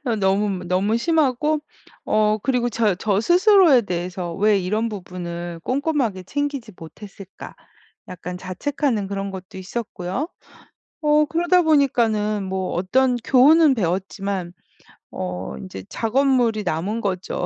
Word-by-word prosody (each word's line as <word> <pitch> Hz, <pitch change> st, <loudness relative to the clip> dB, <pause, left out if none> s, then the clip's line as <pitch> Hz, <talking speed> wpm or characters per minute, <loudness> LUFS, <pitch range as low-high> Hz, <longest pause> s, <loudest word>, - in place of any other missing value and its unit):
어 235 Hz, -2 st, +1 dB
너무, 195 Hz, -1 st, 0 dB
너무 195 Hz, +5 st, +1 dB
심하고 300 Hz, +1 st, +1 dB, 0.4 s
어 215 Hz, 0 st, +2 dB
그리고 250 Hz, -2 st, +1 dB
저 215 Hz, -3 st, +1 dB
저 200 Hz, +1 st, 0 dB
스스로에 355 Hz, -, +5 dB
대해서 180 Hz, -2 st, -4 dB
'왜 205 Hz, +2 st, +3 dB
이런 210 Hz, +5 st, -1 dB
부분을 175 Hz, -4 st, -6 dB
꼼꼼하게 260 Hz, -, -1 dB
챙기지 280 Hz, -1 st, -3 dB
못했을까.' 195 Hz, +3 st, -11 dB, 0.5 s
약간 180 Hz, 0 st, -7 dB
자책하는 215 Hz, -, -2 dB
그런 195 Hz, 0 st, -4 dB
것도 190 Hz, 0 st, -9 dB
있었고요. 190 Hz, -, -4 dB, 0.7 s
어 300 Hz, 0 st, +4 dB
그러다 350 Hz, +3 st, +2 dB
보니까는 225 Hz, -, +2 dB
뭐 190 Hz, -1 st, -3 dB
어떤 250 Hz, +8 st, +2 dB
교훈은 290 Hz, +4 st, +5 dB
배웠지만 190 Hz, -2 st, -2 dB, 0.6 s
어 90 Hz, -4 st, -5 dB
인제 95 Hz, +7 st, -8 dB
작업물이 240 Hz, -2 st, +1 dB
남은 190 Hz, +6 st, -2 dB
거죠, 185 Hz, -3 st, -3 dB
210 Hz, 280 characters per minute, -22 LUFS, 185-265 Hz, 0.7 s, 스스로에